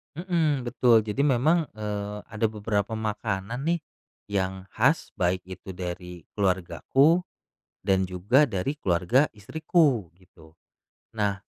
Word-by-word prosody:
Mmm, 165 -5 0
betul, 120 -2 +4
jadi 110 +5 -2
memang, 150 +5 +3
eee, 105 -1 -4
ada 110 +1 -1
beberapa 105 0 -1
makanan 110 +3 -3
nih 170 +1 +1 0.5
yang 95 -1 -2
khas, - - +2
baik 90 +1 +1
itu 95 +1 -9
dari 90 -1 -6 0.2
keluargaku 100 - +2 0.6
dan 95 -2 +3
juga 120 +10 +3
dari 100 +8 -1
keluarga 95 - +2
istriku 135 - +1
gitu. 80 -4 -20 0.6
Nah 100 -2 0
105 Hz, 115 wpm, -26 LUFS, 95-135 Hz, 0.6 s, betul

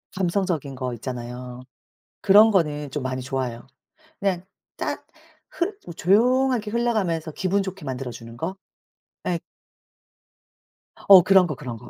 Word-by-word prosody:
감성적인 175 -6 -1
거 125 -1 -3
있잖아요. 125 +1 -7 0.6
그런 210 +3 +7
거는 150 -7 0
좀 145 +1 -4
많이 130 0 -3
좋아해요. 130 -2 -4 0.5
그냥 190 -3 0 0.3
딱 - - -4 0.4
흘 405 -4 -2
뭐 170 - -8
조용하게 235 +5 +2
흘러가면서 210 -9 0
기분 190 +5 0
좋게 190 -3 -7
만들어 130 -1 -4
주는 115 0 -10
거? 175 +9 -4 0.7
예. 175 -2 +1 1.7
어 195 -2 +10
그런 190 -1 +5
거 150 - -4
그런 125 -4 -7
거. 120 +2 -13
170 Hz, 260 characters per minute, -24 LUFS, 130-195 Hz, 1.7 s, 어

